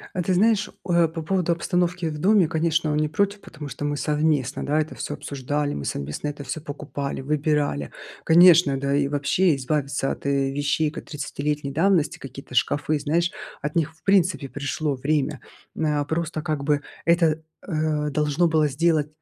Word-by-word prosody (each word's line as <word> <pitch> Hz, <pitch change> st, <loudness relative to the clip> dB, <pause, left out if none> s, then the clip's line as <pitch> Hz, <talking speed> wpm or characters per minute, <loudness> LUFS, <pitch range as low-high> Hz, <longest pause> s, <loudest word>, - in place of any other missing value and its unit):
Э, 180 Hz, -, 0 dB
ты 185 Hz, +2 st, 0 dB
знаешь, 210 Hz, +2 st, +3 dB, 0.2 s
э, 170 Hz, -2 st, +3 dB
по 160 Hz, 0 st, -6 dB
поводу 180 Hz, 0 st, 0 dB
обстановки 175 Hz, 0 st, 0 dB
в 150 Hz, -1 st, -6 dB
доме. 195 Hz, -1 st, +4 dB
Конечно, 160 Hz, -1 st, +1 dB
он 150 Hz, -, 0 dB
не 155 Hz, 0 st, +1 dB
против, 200 Hz, +5 st, 0 dB
потому 150 Hz, -3 st, -9 dB
что 145 Hz, -, -5 dB
мы 145 Hz, 0 st, -1 dB
совместно, 150 Hz, -3 st, 0 dB
да, 150 Hz, +2 st, +1 dB
это 155 Hz, +1 st, -2 dB
всё -, -, -4 dB
обсуждали, 145 Hz, +1 st, -3 dB
мы 70 Hz, -, -5 dB
совместно 75 Hz, -, -4 dB
это 145 Hz, -1 st, -7 dB
всё 140 Hz, +4 st, -5 dB
покупали, 145 Hz, -2 st, -5 dB
выбирали. 145 Hz, -, 0 dB, 0.3 s
Конечно, 170 Hz, -4 st, +6 dB
да 140 Hz, 0 st, -1 dB
и 140 Hz, -1 st, +2 dB
вообще 145 Hz, +4 st, +2 dB
избавиться 140 Hz, 0 st, -1 dB
от, -, -, -7 dB
э, 140 Hz, -1 st, +1 dB
вещей 145 Hz, +2 st, 0 dB
кот -, -, -8 dB
тридцатилетней 145 Hz, -1 st, -3 dB
давности, 165 Hz, -1 st, +2 dB
какие-то 135 Hz, 0 st, -10 dB
шкафы, 145 Hz, +4 st, +1 dB
знаешь, 170 Hz, +5 st, +1 dB, 0.3 s
от 150 Hz, +1 st, -3 dB
них, 160 Hz, -1 st, 0 dB
в -, -, -30 dB
принципе, 180 Hz, -8 st, +2 dB
пришло 145 Hz, 0 st, -2 dB
время, 145 Hz, +2 st, -1 dB, 0.4 s
м, 160 Hz, -, 0 dB
э. 145 Hz, -1 st, +1 dB
Просто 160 Hz, 0 st, -2 dB
как 155 Hz, -3 st, -2 dB
бы 145 Hz, 0 st, +1 dB, 0.2 s
это, 165 Hz, -2 st, +3 dB, 0.3 s
э, 155 Hz, -3 st, 0 dB
должно 150 Hz, +3 st, +2 dB
было 155 Hz, -2 st, +3 dB
сделать. 155 Hz, +1 st, +1 dB
150 Hz, 180 wpm, -24 LUFS, 145-170 Hz, 0.4 s, Конечно